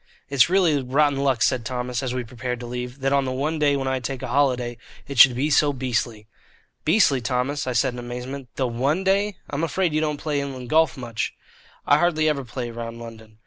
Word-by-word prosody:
"It's 140 +1 +4
really 175 -6 +3
rotten 140 +2 +2
luck," 135 -4 +1
said 125 -1 +1
Thomas, 125 0 -3
as 130 -2 -2
we 125 0 -2
prepared 125 +1 -5
to - - -6
leave, 125 +2 -6
"that 135 +1 +1
on 140 0 +3
the 130 - -2
one 150 +5 -2
day 145 -1 +3
when 135 -1 -3
I 130 0 0
take 130 +1 -5
a 130 - -4
holiday, 125 -3 +1 0.3
it 140 -3 -4
should 125 0 +9
be 145 +5 0
so 145 0 +4
beastly." 120 -4 -2 0.6
"Beastly, 155 - +3
Thomas?" 130 +4 -1
I 125 - -1
said 125 +2 +1
in 125 - -7
amazement. 125 +2 -6
"The 130 - 0
one 135 +10 0
day? 200 +1 +1 0.2
I'm 145 +3 -2
afraid 165 +1 0
you 155 - +1
don't 150 -1 -1
play 145 -1 -2
inland 130 -3 -6
golf 160 -1 +3
much?" 120 -3 -4 0.5
"I 145 - +4
hardly 155 -2 +2
ever 145 -3 0
play 120 0 -5
round 115 0 -6
London." 110 -2 -11
130 Hz, 220 wpm, -23 LUFS, 125-145 Hz, 0.6 s, should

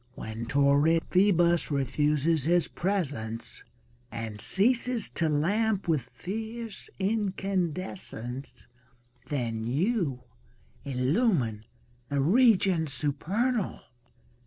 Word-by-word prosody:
When 110 +1 -6
torrid 145 +4 +3
Phoebus 175 -3 +3
refuses 150 +2 +1
his 175 +1 +3
presence 140 - -3 0.5
And 110 -2 -5
ceases 240 +2 +2
to 165 -2 0
lamp 200 +8 +1
with 145 -7 0
fierce 220 +2 -6
incandescence^ 185 - -3 0.6
Then 115 -5 -2
you 150 - 0 0.6
illumine 130 - 0 0.4
the 140 - 0
regions 185 - +4
supernal. 185 - -1
165 Hz, 80 wpm, -28 LUFS, 135-200 Hz, 0.6 s, regions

